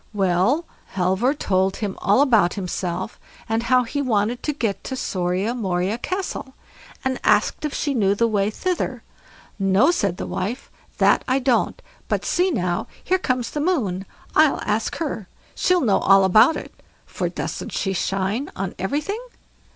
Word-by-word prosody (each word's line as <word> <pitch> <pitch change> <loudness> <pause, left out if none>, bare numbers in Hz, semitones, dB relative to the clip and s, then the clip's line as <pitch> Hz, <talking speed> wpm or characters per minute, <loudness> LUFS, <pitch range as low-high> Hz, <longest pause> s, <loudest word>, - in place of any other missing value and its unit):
Well, 195 - +2 0.3
Halvor 190 +9 +2
told 190 -7 +1
her 205 -3 -3
all 205 +7 +3
about 225 -10 +3
himself, 185 0 -4 0.3
and 225 +1 0
how 250 +2 +3
he 285 +5 -3
wanted 230 -2 0
to 300 - -1
get 225 -9 -2
to 260 - -3
SORIA 185 0 -1
MORIA 195 -1 -1
CASTLE, 365 -6 -4 0.5
and 260 -1 0
asked 210 +7 +2
if 300 - -3
she 285 - -1
knew 200 -5 +2
the 230 +3 +2
way 205 -2 +1
thither. 360 +11 -2 0.6
"No", 195 - +4
said 195 - 0
the - - -4
old - - -6
wife, 220 +8 -4 0.3
"that - - +4
I 260 - +2
don't, 255 -3 +1 0.3
but - - -1
see 360 +2 +2
now, 180 - -1 0.2
here 375 +1 +1
comes 255 -7 -1
the 295 - -2
Moon, 210 - 0 0.3
I'll 310 -2 +5
ask 215 +2 0
her, 255 - -3 0.3
she'll 360 -1 +2
know 215 -8 +3
all 195 0 +5
about 215 - +5
it, - - -8 0.3
for - - -3
doesn't - - -5
she 195 - -1
shine 195 +8 -1
on 190 -1 -3
everything?" 300 - -2
220 Hz, 165 wpm, -22 LUFS, 190-275 Hz, 0.6 s, I'll